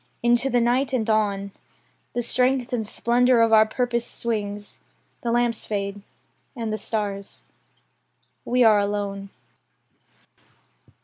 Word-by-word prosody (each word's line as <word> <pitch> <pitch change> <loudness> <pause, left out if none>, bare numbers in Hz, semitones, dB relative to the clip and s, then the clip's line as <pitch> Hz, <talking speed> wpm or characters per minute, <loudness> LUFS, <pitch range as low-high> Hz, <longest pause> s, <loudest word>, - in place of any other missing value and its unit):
Into 240 +3 +3
the 245 -1 +2
night, 255 +3 +1
and 235 -3 0
on, 200 -2 0 0.6
The 240 - -1
strength 250 +1 +1
and 220 -3 -1
splendour 245 +2 +2
of 225 -1 +3
our 220 0 +6
purpose 240 0 -1
swings. 205 -4 -4 0.4
The 235 - -2
lamps 240 -1 0
fade; 200 -1 -3 0.5
and 225 -3 -3
the 215 - -3
stars. 200 -2 -4 1.0
We 250 0 +2
are 215 -2 +6
alone. 200 -1 -3
225 Hz, 120 wpm, -24 LUFS, 205-240 Hz, 1.0 s, our